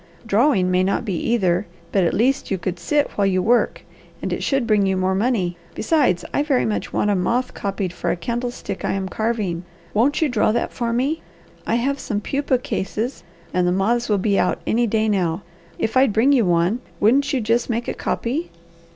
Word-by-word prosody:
"Drawing 210 -4 +3
may 180 0 +3
not 195 +5 0
be 200 - -2
either, 190 -1 +1 0.2
but 195 - +2
at 170 - +2
least 260 +6 +1
you 195 - 0
could 180 0 -4
sit 290 - +1
while 200 -1 +1
you 185 -1 +2
work, 235 +6 +2 0.4
and - - -3
it - - -3
should 270 -3 +1
bring 210 -3 +3
you 190 0 +1
more 185 0 +1
money. 190 -4 0 0.2
Besides, 250 - +1
I - - +2
very 285 -4 +1
much 215 - -2
want 210 - +1
a - - +2
moth 235 +8 0
copied 195 -2 -3
for - - -3
a - - +1
candlestick 235 +1 -4
I - - 0
am 195 -1 -2
carving. 210 -5 -2 0.3
Won't 245 +7 +2
you 315 - +3
draw 225 -5 +2
that 235 - -1
for 235 -2 -2
me? 270 +7 0 0.5
I - - +2
have 270 +4 0
some 210 -6 -2
pupae 275 +3 0
cases 220 +6 -3 0.3
and 180 0 +2
the - - +3
moths 225 +6 +1
will 210 - +3
be 200 +1 +1
out - - +1
any 235 +1 +2
day 220 0 +1
now. 185 -3 0 0.3
If 220 - -2
I'd 260 -4 +4
bring 235 +7 +4
you 250 -6 +4
one, 175 +6 +2 0.2
wouldn't 275 +7 +3
you 270 - +1
just 230 +2 0
make 235 0 -1
a - - -1
copy?" 275 +9 -2
220 Hz, 210 wpm, -21 LUFS, 190-245 Hz, 0.5 s, I'd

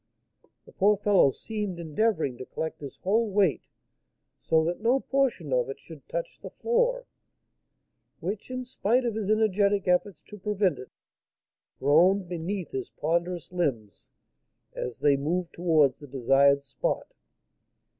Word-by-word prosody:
The - - -16
poor 205 +2 +3
fellow 205 -7 +4
seemed 205 - -5
endeavouring 160 - 0
to 130 - -6
collect 160 -1 -5
his 140 -3 -8
whole 220 +4 +2
weight, 195 -6 +1 0.7
so 160 0 +2
that 175 +4 -2
no 240 +4 +3
portion 255 - 0
of 125 0 +1
it 135 - -6
should 160 -4 -14
touch - - -4
the - - -8
floor; - - 0 1.1
which, 200 +7 -5
in 255 0 -4
spite 245 +1 0
of 235 - 0
his 210 -2 -3
energetic 205 -2 +2
efforts 180 +1 +1
to 210 - -12
prevent 195 -5 0
it, 125 - -10 0.9
groaned 180 +7 +4
beneath 175 0 -4
his 130 -2 -4
ponderous 170 +2 -2
limbs 130 - -3 0.7
as 125 +1 -5
they 145 -1 +4
moved 170 +5 -2
towards 155 -6 +2
the 145 - -11
desired 140 +2 +3
spot. 135 -1 -3
180 Hz, 140 wpm, -27 LUFS, 145-210 Hz, 1.1 s, fellow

